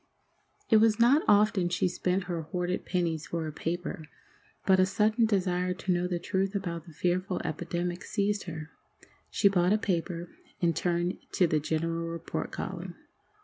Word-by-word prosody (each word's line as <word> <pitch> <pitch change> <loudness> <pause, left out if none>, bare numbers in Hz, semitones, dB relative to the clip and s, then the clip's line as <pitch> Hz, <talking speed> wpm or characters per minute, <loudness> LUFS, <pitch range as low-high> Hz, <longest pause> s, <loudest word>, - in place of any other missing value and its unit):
It 220 - +8
was 220 0 +4
not 255 +6 +6
often 205 -3 +4
she 180 +1 +1
spent 180 +1 0
her 175 -2 -3
hoarded 180 +2 -3
pennies 165 -3 -1
for 170 -1 -2
a 155 - -4
paper, 165 +1 -4 0.6
but 190 -1 +5
a 185 - +6
sudden 215 +4 +2
desire 180 -3 +1
to 190 0 -2
know 175 +1 0
the 180 -1 -1
truth 190 +3 -1
about 170 -4 -3
the - - -10
fearful 180 +3 -1
epidemic 175 +2 -3
seized 205 -1 -1
her. 160 -2 -7 0.6
She 200 - +3
bought 185 -1 +3
a - - +4
paper, 175 -3 -2 0.3
and 170 -2 +2
turned 175 +2 0
to 180 - +4
the 155 -2 +2
general 165 +2 -1
report 165 0 -4
column. - - -5
180 Hz, 165 wpm, -29 LUFS, 170-195 Hz, 0.6 s, It